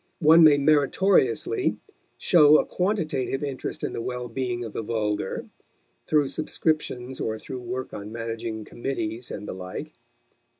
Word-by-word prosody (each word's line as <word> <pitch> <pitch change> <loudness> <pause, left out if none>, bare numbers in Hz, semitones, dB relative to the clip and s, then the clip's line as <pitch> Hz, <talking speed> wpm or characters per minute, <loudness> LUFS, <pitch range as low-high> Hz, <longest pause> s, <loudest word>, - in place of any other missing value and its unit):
One 165 0 +7
may 150 -2 +7
meritoriously 155 - +2 0.4
show 155 -4 +6
a - - +1
quantitative 160 -9 -1
interest 140 -3 -5
in - - -2
the - - -3
well 125 0 -4
being 120 0 -3
of 115 - -7
the - - -3
vulgar, 105 -3 -2 0.6
through 150 -3 +3
subscriptions 140 -4 -2
or 110 0 -2
through 125 +3 -7
work 125 +2 -5
on 105 +1 -7
managing 115 -1 -5
committees 120 -2 -4
and 105 - -6
the - - -4
like. 90 0 -7
130 Hz, 140 wpm, -25 LUFS, 115-150 Hz, 0.6 s, One